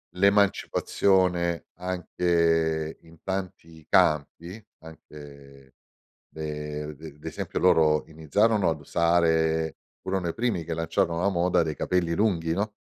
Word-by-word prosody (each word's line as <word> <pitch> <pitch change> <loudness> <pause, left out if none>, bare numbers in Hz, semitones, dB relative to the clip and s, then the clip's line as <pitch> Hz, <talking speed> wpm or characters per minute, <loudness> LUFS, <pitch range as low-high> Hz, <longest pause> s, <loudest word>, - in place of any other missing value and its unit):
l'emancipazione 95 -3 +2
anche 85 -3 0
in 80 -1 -19
tanti 85 -4 -6
campi, 85 +7 +1 0.2
anche 70 -4 -14 0.6
le 75 -1 -5
de 75 0 -11
d'esempio - - -6
loro 75 -1 +4
iniziarono 95 +7 +1
ad 80 -2 -3
usare 80 0 +1 0.3
furono 95 -2 -2
i 85 - -3
primi 115 -8 -1
che 85 0 -3
lanciarono 85 +1 -1
la 100 - +2
moda 90 -1 +2
dei 80 -2 -3
capelli 90 -2 0
lunghi, 85 -4 +1
no, 105 +3 -3
85 Hz, 110 wpm, -26 LUFS, 80-90 Hz, 0.6 s, loro